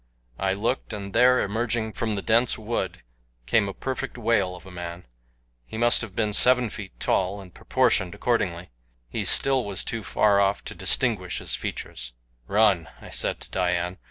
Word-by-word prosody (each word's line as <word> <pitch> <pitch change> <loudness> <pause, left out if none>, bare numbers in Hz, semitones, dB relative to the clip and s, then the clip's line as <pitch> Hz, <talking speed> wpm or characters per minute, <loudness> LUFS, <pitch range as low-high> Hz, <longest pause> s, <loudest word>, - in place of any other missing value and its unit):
I 95 -1 +1
looked, 115 +6 -2
and 100 -1 -6
there, 125 +2 +5
emerging 110 +1 -1
from 110 -2 -2
the 100 - -4
dense 115 +2 +3
wood, 105 - -3 0.4
came 100 - +2
a - - -5
perfect 135 +2 -4
whale 110 -6 +1
of 90 - -13
a 95 - -11
man. 90 0 -7 0.6
He 110 - -7
must 120 +1 +4
have 105 -5 -7
been 105 -2 0
seven 125 0 +5
feet 100 -3 -9
tall, 95 +2 0
and 95 -3 -12
proportioned 110 -9 +1
accordingly. 90 - -1 0.4
He - - -2
still 135 -2 +2
was 100 -3 -4
too 115 - -3
far 100 +3 +3
off 100 0 +2
to - - -5
distinguish 105 -9 0
his - - -2
features. - - -6 0.3
"Run," 100 -6 +3
I - - -12
said - - 0
to - - -8
Dian. 90 -1 -1
100 Hz, 175 wpm, -25 LUFS, 90-115 Hz, 0.6 s, there